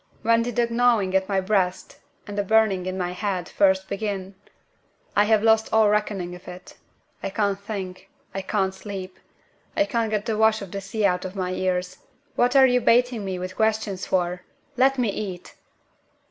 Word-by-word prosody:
When 230 +1 +4
did 240 +1 -3
the 240 -1 +3
gnawing 230 -5 +2
in 190 0 +3
my 195 -1 +2
breast, 185 -2 -1 0.3
and 205 - -7
the 205 - +1
burning 200 -3 +2
in 185 0 -3
my 180 -1 -2
head, 185 -1 -3
first 190 -1 +2
begin? 200 -2 -4 0.8
I 205 - +5
have 215 0 +3
lost 220 0 +4
all 220 -1 +5
reckoning 205 -4 -1
of 180 - -12
it. 180 0 -10 0.5
I - - -3
can't 200 0 0
think; 195 -3 -7 0.2
I 195 - -3
can't 190 -1 -1
sleep; 190 -1 -8 0.6
I 300 - +4
can't 230 -6 -1
get 210 0 -1
the 220 -2 -1
wash 220 -1 +3
of 190 - -10
the 200 - -4
sea 205 +2 -2
out 180 -2 +1
of 185 +1 -6
my 185 -2 -2
ears. 185 -1 -2 0.4
What 245 +1 +2
are 270 -1 +8
you 250 -1 +3
baiting 240 -2 +3
me 190 -1 -3
with 185 +1 -6
questions 220 -3 0
for? 180 -1 0 0.3
Let 265 +2 +3
me 245 -4 +1
eat!" 190 -3 -5
200 Hz, 190 wpm, -24 LUFS, 185-220 Hz, 0.8 s, are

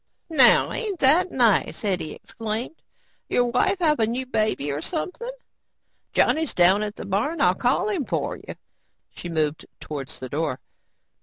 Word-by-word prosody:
"Now 265 -6 +6
ain't 425 -6 -3
that 325 +8 +5
nice," 235 -6 +2
Hetty 185 -6 -1
exclaimed. 225 +7 -6 0.5
"Your 245 - +2
wife 380 +11 +2
have 305 -3 +3
a 220 - +3
new 250 +3 -2
baby 215 - -1
or 145 +2 -3
something? 365 - -4 0.8
Johnny's 320 -2 +1
down 185 +3 +5
at 210 0 -3
the - - -8
barn. 215 - -1
I'll 180 -6 +4
call 250 - +1
him 380 -10 -1
for - - -2
you." - - -10 0.6
She 175 - -8
moved 155 -2 -1
towards 140 -3 -7
the 130 - -6
door. 145 -1 -2
225 Hz, 155 wpm, -24 LUFS, -, 0.8 s, Now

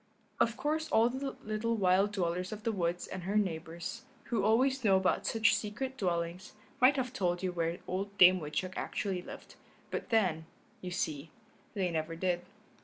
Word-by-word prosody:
Of 230 0 +2
course 310 +3 -1
all 225 +2 +4
the 270 +1 -4
little 215 +2 -1
wild 195 +1 +3
dwellers 180 -1 -1
of 215 0 -7
the 230 - +1
woods 175 -3 -1
and 190 - -6
her 195 +4 -3
neighbors, 170 -1 -2 0.2
who 225 -5 -1
always 255 +5 +3
know 195 -3 +5
about 190 -1 +1
such 225 -2 +3
secret 260 +5 -3
dwellings, 175 -4 -2 0.3
might 255 +3 +6
have 255 -2 -2
told 180 -6 -1
you 185 - 0
where 170 -1 -1
old 200 +2 -4
Dame 185 0 +8
Woodchuck 175 +4 -3
actually 190 -3 -2
lived, - - -11 0.3
but - - -4
then, 180 -9 +1 0.3
you 185 - -5
see, 155 -4 -3 0.5
they 185 -3 0
never 160 0 -2
did. 175 0 0
190 Hz, 175 wpm, -32 LUFS, 175-225 Hz, 0.5 s, Dame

